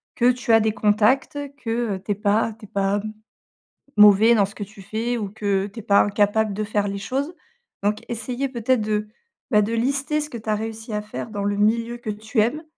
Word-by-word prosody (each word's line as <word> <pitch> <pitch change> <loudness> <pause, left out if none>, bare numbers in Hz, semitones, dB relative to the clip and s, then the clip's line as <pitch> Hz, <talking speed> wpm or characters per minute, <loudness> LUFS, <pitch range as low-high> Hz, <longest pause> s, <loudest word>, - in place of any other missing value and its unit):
que 245 +1 +4
tu 245 -2 0
as 225 - +7
des 220 0 +1
contacts 215 +7 +2 0.2
que, 230 -4 -2
heu, 190 - -8
tu - - -2
es - - +1
pas 210 +2 +1
tu 215 - -11
es - - -14
pas 195 +1 0
m 215 - -5 0.9
mauvais 210 +2 +7
dans 205 -3 +3
ce 200 - -14
que 205 - -4
tu 200 0 -14
fais 225 +5 -2
ou 210 -3 -3
que 200 -2 -1
tu 205 - -12
es - - -6
pas 200 -1 +4
incapable 205 +1 +2
de 215 +2 -2
faire 205 -1 0
les 200 0 -3
choses, 270 - -3 0.5
donc 210 +1 +1
essayer 245 +4 -3
peut-être 250 -1 0
de, 210 0 -1 0.5
bah, 210 -1 +5
de 210 +3 -2
lister 275 +6 0
ce 300 - -4
que 235 - -6
tu 220 0 -5
as 210 - +2
réussi 220 +1 -6
à 210 - -1
faire 210 +2 -7
dans 205 -2 -3
le 205 0 0
milieu 230 +3 +1
que 230 -2 -5
tu 215 +2 -1
aimes 285 +9 0
215 Hz, 235 wpm, -23 LUFS, 205-235 Hz, 0.9 s, as